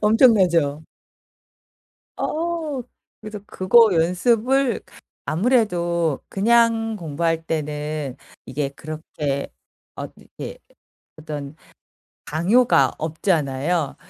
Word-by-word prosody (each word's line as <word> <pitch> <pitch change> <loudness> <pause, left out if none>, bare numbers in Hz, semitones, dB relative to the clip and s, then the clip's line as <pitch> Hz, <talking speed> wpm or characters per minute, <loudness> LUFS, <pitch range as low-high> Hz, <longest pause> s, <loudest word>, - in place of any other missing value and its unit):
엄청나죠? 185 - +4 1.3
어. 320 -4 -2 0.4
그래서 215 -1 -7
그거 215 +5 +5
연습을 230 +9 +2 0.4
아무래도 175 - +1
그냥 225 +1 +3
공부할 165 -2 -2
때는 150 -3 -3 0.3
이게 145 -1 -2
그렇게 145 -1 -5 0.4
어떻게 - - -9 0.6
어떤 150 -2 -6 0.7
강요가 205 - +3
없잖아요. 155 -1 0
170 Hz, 175 characters per minute, -22 LUFS, 155-225 Hz, 1.3 s, 그거